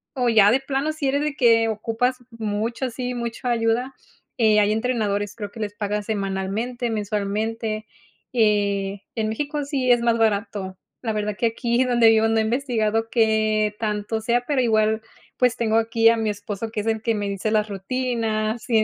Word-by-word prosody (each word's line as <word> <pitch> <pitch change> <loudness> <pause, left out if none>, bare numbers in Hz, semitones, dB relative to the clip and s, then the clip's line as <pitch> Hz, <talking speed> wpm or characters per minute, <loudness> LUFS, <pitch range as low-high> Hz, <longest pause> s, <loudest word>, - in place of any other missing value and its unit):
O 250 -2 +1
ya 215 -3 +6
de 265 +3 +2
plano, 275 +3 -1
si 290 -3 -1
eres 285 +2 +1
de 300 - -1
que 230 -2 +4
ocupas 225 +3 -1
mucho, 230 +3 -2
¿sí? 250 +1 -4
¿Mucho 235 +1 -4
ayuda? 240 +2 0 0.4
Eh, 215 -2 +4
hay 205 0 +3
entrenadores. 215 -3 -1
Creo 205 -3 -6
que 230 - -11
les 205 -1 -3
paga 210 0 -2
semanalmente, 205 +4 -2
mensualmente, 215 +1 -2 0.4
eh, 205 -4 +1
en 220 -2 -1
México 290 +6 -2
sí, 275 -3 -1
es 240 -1 +4
más 235 -1 +2
barato. 205 -3 -1 0.2
La 225 -3 -2
verdad 210 -1 -2
que 230 - +1
aquí 235 +2 0
donde 240 -3 +4
vivo, 225 0 +4
no 225 0 +1
he - - +4
investigado 225 -2 0
que 215 -2 +2
tanto 210 0 -2
sea, 240 +2 +1
pero 280 -3 +2
igual 220 -1 +2 0.4
pues, 250 -2 +3
tengo 225 -1 +1
aquí 225 0 +4
a 230 - +3
mi 220 -1 0
esposo, 205 +1 -4
que 215 - -2
es 205 - -8
el 220 -1 0
que 230 0 0
me 205 -1 -2
dice 200 +2 -2
las 215 -1 +2
rutinas 220 +1 -2
y 220 -2 +4
225 Hz, 185 wpm, -23 LUFS, 210-240 Hz, 0.4 s, ya